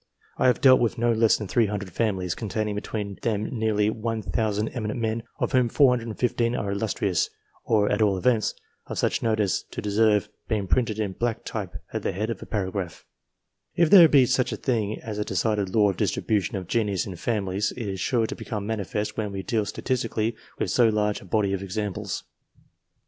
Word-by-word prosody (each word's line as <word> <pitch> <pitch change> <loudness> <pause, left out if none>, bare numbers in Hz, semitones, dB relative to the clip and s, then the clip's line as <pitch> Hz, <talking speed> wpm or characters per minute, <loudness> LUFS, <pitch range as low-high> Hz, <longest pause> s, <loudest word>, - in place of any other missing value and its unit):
I - - +4
have 125 - +3
dealt 130 -1 +7
with 115 0 0
no 120 0 +2
less 115 0 +4
than 105 - -5
300 105 -3 0
families 95 -4 -1
containing 110 -1 -2
between 105 -1 -4
them 105 -3 0
nearly 110 -2 +1
1,000 110 -1 -1
eminent 110 -2 -4
men, 115 0 -1 0.2
of - - -1
whom 125 -3 +3
415 120 -2 +2
are 100 -4 -2
illustrious, 100 -3 0 0.4
or, 105 -2 +3
at 105 +2 +1
all 100 -3 +3
events, 110 +3 +1 0.3
of - - -5
such - - +1
note 110 -1 +1
as 100 -4 +1
to - - -6
deserve 105 0 +2 0.2
being 105 -4 0
printed 110 +3 +1
in 105 -3 -1
black 115 +4 -2
type - - -5 0.2
at - - -2
the - - -2
head 110 +5 -2
of 105 - -6
a - - -9
paragraph 95 -4 -3 0.7
If 170 -1 +3
there 175 -5 +10
be 135 -4 +6
such 130 0 +1
a - - -3
thing 110 -5 -1
as 105 -2 -5
a - - +1
decided 105 -3 0
law 105 -2 +5
of 95 - -9
distribution 105 -4 0
of 95 -2 -4
genius 100 -2 0
in 95 - -6
families, 100 0 -1
it 115 -4 -4
is 95 -1 -4
sure 115 +4 +1
to - - -5
become 105 -2 -5
manifest 105 0 -3
when 105 -2 -2
we 95 -1 -5
deal 110 -3 0
statistically 115 -3 -1 0.2
with - - -1
so 120 -2 +4
large 105 -1 0
a - - -13
body 100 +1 +1
of 95 - -2
examples. 100 +1 -3
110 Hz, 195 wpm, -25 LUFS, 100-115 Hz, 0.7 s, there